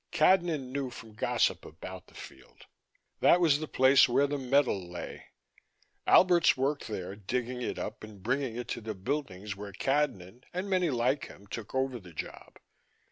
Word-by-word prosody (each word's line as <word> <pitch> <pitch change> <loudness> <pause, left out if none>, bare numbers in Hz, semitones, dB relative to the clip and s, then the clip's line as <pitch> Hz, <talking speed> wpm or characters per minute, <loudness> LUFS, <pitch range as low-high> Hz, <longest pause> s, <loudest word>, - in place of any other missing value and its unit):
Cadnan 165 -5 +3
knew 135 -1 -2
from 115 -3 -11
gossip 105 - +1
about 90 +3 -9
the - - -20
field: 65 - -13 0.5
that 175 - +6
was 155 -5 +4
the 155 - -4
place 130 +1 +5
where 140 +4 +4
the 145 0 -2
metal 130 -9 +1
lay. 90 - -7 0.8
Alberts 175 -5 +6
worked 140 +2 -1
there, 95 -3 -5
digging 125 +4 -3
it - - -3
up - - -5
and 105 -3 -11
bringing 130 +1 -1
it 120 0 -5
to - - -3
the 110 -1 -5
buildings 105 -3 -3
where 100 0 -8
Cadnan 125 -4 -1
and 185 +3 -3
many 185 -3 +2
like 130 +2 +1
him 100 - -14
took 110 +3 -7
over 130 -2 0
the 90 -4 -14
job. - - -8
125 Hz, 170 wpm, -30 LUFS, 105-145 Hz, 0.8 s, that